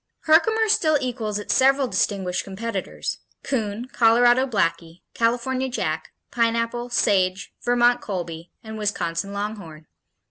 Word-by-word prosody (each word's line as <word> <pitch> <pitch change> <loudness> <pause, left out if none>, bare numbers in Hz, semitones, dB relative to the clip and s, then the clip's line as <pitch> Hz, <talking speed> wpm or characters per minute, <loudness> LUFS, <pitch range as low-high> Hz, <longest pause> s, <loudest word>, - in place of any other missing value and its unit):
Herkimer 440 +8 +3
still 315 -8 +3
equals 225 -5 -3
its 210 - -2
several 270 0 +4
distinguished 190 -6 -1
competitors, 200 0 -4 0.2
Coon, 225 -3 -2
Colorado 240 +3 +4
Blackie, 170 -6 -1
California 250 +3 0
Jack, 250 - -3 0.2
Pineapple, 230 0 0
Sage, 190 -4 +1
Vermont 245 0 +3
Colby 170 -4 -5
and 220 -1 -7
Wisconsin 195 -2 -2
Longhorn. 200 -7 -6
230 Hz, 110 wpm, -23 LUFS, 195-245 Hz, 0.2 s, several